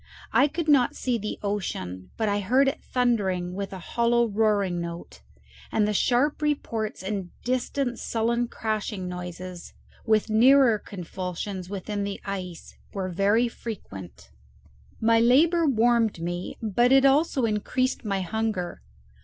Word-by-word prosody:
I 275 - +5
could 320 +2 -4
not 275 -5 +4
see 245 -3 -1
the 210 +1 -4
ocean, 95 - -4
but 220 - 0
I 205 0 +1
heard 255 +8 +3
it 270 - -2
thundering 195 -8 0
with 195 +1 -4
a 190 - -6
hollow 235 +5 +1
roaring 200 -4 +1
note; 170 - -7 0.5
and 210 -1 +2
the 210 - 0
sharp 260 +8 +2
reports 230 -9 -2
and 195 -2 -3
distant 255 0 -1
sullen 235 +1 0
crashing 215 -4 -3
noises, 180 0 -7 0.3
with 220 -1 +2
nearer 235 +1 +5
convulsions 185 0 -6
within 205 +1 -3
the 200 0 -4
ice, 185 -4 -6 0.2
were 190 -2 -3
very 200 +6 +2
frequent. 100 - -9 0.7
My 225 0 +4
labour 315 +8 +4
warmed 230 -5 +2
me, 175 +2 -4
but 240 +4 +2
it 270 0 +6
also 275 -2 +3
increased 230 +4 -1
my 195 -3 -1
hunger. 210 - -2
215 Hz, 135 wpm, -26 LUFS, 185-240 Hz, 0.7 s, it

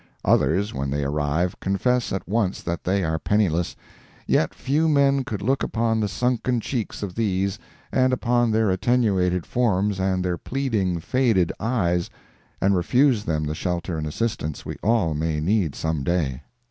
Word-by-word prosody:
Others, 100 +2 +2
when 70 +1 -2
they 70 +1 -1
arrive, 75 +5 -1
confess 120 +6 0
at 95 - -3
once 100 -1 0
that 85 -1 -4
they 95 +1 +1
are 80 -1 -1
penniless, 90 -5 +1 0.5
yet 80 - +2
few 150 +4 +1
men 140 -2 +3
could 105 -5 -5
look 135 +5 +1
upon 115 -1 0
the 105 - +1
sunken 125 +3 0
cheeks 115 -2 -4
of 95 -3 -4
these, 100 -1 -1 0.3
and 130 0 +3
upon 120 -1 +2
their 110 -2 +2
attenuated 95 -4 +1
forms 105 -5 +1
and 95 -1 0
their 90 -1 -1
pleading, 110 -10 -1
faded 110 -2 +1
eyes, 90 -7 0 0.5
and 100 +1 +3
refuse 120 +4 +2
them 75 -1 -1
the 75 0 -2
shelter 90 +1 -3
and 75 -1 -3
assistance 80 -4 -3
we - - -5
all 105 -8 +2
may 75 0 -1
need 90 -1 +1
some 80 -3 -2
day. 70 -5 -1
95 Hz, 160 wpm, -24 LUFS, 85-115 Hz, 0.5 s, men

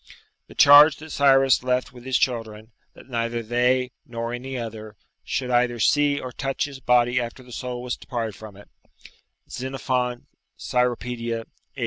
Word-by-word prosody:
The - - -15
charge 145 +1 +8
that 155 +2 -12
Cyrus 135 -2 +4
left 125 0 -1
with 125 -1 -14
his 130 -1 +1
children, 110 -3 -2 0.2
that - - -15
neither 115 -1 -2
they, 125 +2 +1
nor 115 0 -5
any 130 +2 -5
other, 110 -2 -7 0.3
should 125 -2 -3
either 120 -1 +1
see 145 +4 +2
or 130 - -7
touch 135 +2 -2
his 140 -2 -9
body 125 0 +2
after 120 +2 -7
the 125 - -16
soul 125 0 -5
was 125 -1 -3
departed 115 -4 -4
from 105 0 -12
it, 100 - -15 0.8
[Xenophon, 125 -1 -3 0.3
Cyropedia, 120 -2 -2 0.3
viii. - - -10
125 Hz, 155 wpm, -23 LUFS, 115-130 Hz, 0.8 s, charge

